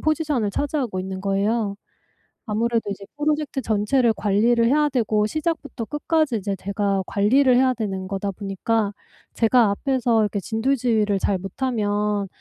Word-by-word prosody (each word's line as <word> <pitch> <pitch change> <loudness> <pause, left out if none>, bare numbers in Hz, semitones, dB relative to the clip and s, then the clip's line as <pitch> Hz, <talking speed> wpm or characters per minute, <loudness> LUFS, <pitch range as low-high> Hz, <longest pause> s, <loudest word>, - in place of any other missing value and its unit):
포지션을 300 -8 0
차지하고 260 -6 -2
있는 190 0 -5
거예요. 200 +1 0 0.7
아무래도 225 0 0
이제 200 0 -6
프로젝트 295 -2 -1
전체를 225 +3 +2
관리를 230 +3 +2
해야 295 +4 +3
되고 215 -5 +1
시작부터 310 -5 -3
끝까지 295 -3 0
이제 200 0 -3
제가 200 0 -1
관리를 250 +6 +3
해야 255 0 +3
되는 195 -4 -3
거다 195 0 -3
보니까 200 +2 -1 0.4
제가 230 -1 +4
앞에서 240 0 +1
이렇게 210 -1 0
진두지휘를 225 -2 0
잘 195 0 +1
못하면 205 -1 -1
220 Hz, 355 characters per minute, -23 LUFS, 200-260 Hz, 0.7 s, 제가